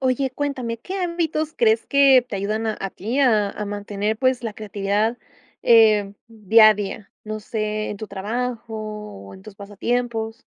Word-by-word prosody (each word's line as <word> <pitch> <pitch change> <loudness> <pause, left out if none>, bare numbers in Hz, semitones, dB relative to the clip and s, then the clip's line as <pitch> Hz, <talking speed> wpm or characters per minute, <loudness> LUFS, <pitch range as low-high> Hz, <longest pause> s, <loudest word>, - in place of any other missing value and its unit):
Oye, 260 0 0
cuéntame, 255 -4 -3
¿qué 375 - -6
ámbitos 325 -3 -2
crees 225 -1 +2
que 275 -2 +6
te 200 - -4
ayudan 215 +3 -2
a 215 -1 -1
a 195 - -3
ti 230 +8 -3
a 215 -6 +3
a 210 - -5
mantener, 205 +1 -3
pues, 255 -1 +1
la 225 -2 -4
creatividad, 210 +2 -1 0.5
eh, 215 -3 +5 0.2
día 220 0 +5
a - - +2
día? 205 0 -6
No 215 0 -4
sé, 215 0 -3
en 210 - -5
tu 215 - -7
trabajo 230 +5 -4
o 210 - -8
en 95 - -14
tus - - -12
pasatiempos. 225 +3 -3
220 Hz, 170 wpm, -22 LUFS, 205-245 Hz, 0.5 s, que